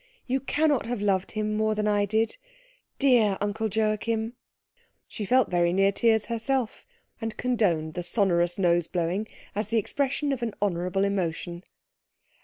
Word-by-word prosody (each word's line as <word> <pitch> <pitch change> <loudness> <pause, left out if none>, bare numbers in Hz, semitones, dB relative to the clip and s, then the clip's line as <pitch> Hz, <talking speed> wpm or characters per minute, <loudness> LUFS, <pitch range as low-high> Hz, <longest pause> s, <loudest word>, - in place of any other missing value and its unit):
You 260 +1 0
cannot 290 -1 +1
have 240 -2 -2
loved 195 -2 0
him 215 0 -1
more 215 0 +1
than 210 0 0
I 205 -1 +2
did 220 - 0 0.6
dear 235 -8 +4
Uncle 205 +2 -1
Joachim!" 220 +2 0 0.7
She 210 - -5
felt 250 0 +3
very 175 -1 +3
near 195 +2 +3
tears 220 +1 +2
herself, 235 +1 -2 0.3
and 225 -1 -4
condoned 180 -11 +1
the 175 - -3
sonorous 175 -2 +1
nose 175 -3 +2
blowing 180 +4 -1 0.3
as 210 0 -2
the 230 - +1
expression 280 +5 0
of 260 - -4
an 225 -3 -3
honourable 180 -1 0
emotion. 175 -3 -2
210 Hz, 150 wpm, -27 LUFS, 185-230 Hz, 0.7 s, dear